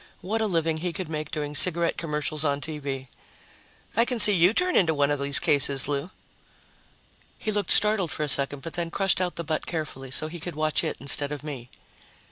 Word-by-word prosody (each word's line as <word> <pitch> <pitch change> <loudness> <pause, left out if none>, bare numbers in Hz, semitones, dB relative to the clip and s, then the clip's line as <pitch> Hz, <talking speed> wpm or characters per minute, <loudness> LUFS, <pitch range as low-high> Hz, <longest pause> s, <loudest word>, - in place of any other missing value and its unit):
What 220 +4 -2
a 220 - +1
living 165 -4 0
he 175 +2 -3
could 185 -4 -5
make 155 -1 -4
doing 150 -1 -4
cigarette 170 +2 +2
commercials 150 -1 -2
on 140 -2 0
TV! 145 -3 -5 0.9
"I 230 - +4
can 245 0 -1
see 210 -1 +7
you 180 0 +4
turn 360 +9 0
into 160 -4 +3
one 145 0 +2
of 145 - -1
these 140 0 +4
cases, 140 -2 +3
Lou." 145 +3 -3 1.3
He 215 - -3
looked 205 -3 -2
startled 210 -5 +3
for 155 - -3
a - - -1
second, 140 -1 0
but 165 - -7
then 170 -1 -2
crushed 195 +1 +1
out 180 -1 -2
the 170 - -5
butt 155 -1 -3
carefully 150 -5 -5
so 155 +4 -2
he 170 +2 -8
could 170 +1 -6
watch 155 0 +1
it - - -3
instead 140 +1 +3
of 150 -1 -6
me. 135 -5 -7
155 Hz, 210 wpm, -25 LUFS, 145-180 Hz, 1.3 s, see